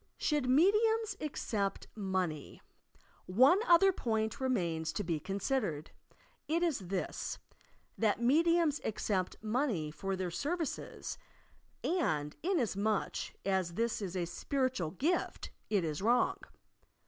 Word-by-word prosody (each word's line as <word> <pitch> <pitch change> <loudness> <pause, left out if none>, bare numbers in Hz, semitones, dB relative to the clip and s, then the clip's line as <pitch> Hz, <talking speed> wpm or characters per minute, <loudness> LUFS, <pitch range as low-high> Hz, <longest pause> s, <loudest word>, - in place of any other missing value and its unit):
SHOULD 295 -4 0
MEDIUMS 425 - +4
ACCEPT 210 -9 -2
MONEY 185 -7 -2
t - - -23 0.7
One 260 - +6
other 370 +3 +7
point 220 - -1
remains 170 -11 0
to 205 - -2
be 165 -3 -1
considered. 195 - -2 0.6
It 335 +3 +1
is 280 - 0
this, 185 0 -3 0.6
that 220 -1 +2
mediums 315 +4 +3
accept 195 -3 -1
money 215 - 0
for 195 +4 -3
their 185 -2 -3
services, 315 - -3 0.6
and 155 - 0
inas 325 - +1
much 210 +1 -1
as 190 -3 0
this 230 +1 0
is 190 -2 -3
a 175 - 0
spiritual 255 - -1
gift, 295 - -1 0.2
it 200 -4 +2
is 155 -1 -2
wrong! 235 +4 +3
220 Hz, 120 wpm, -33 LUFS, 185-295 Hz, 0.7 s, other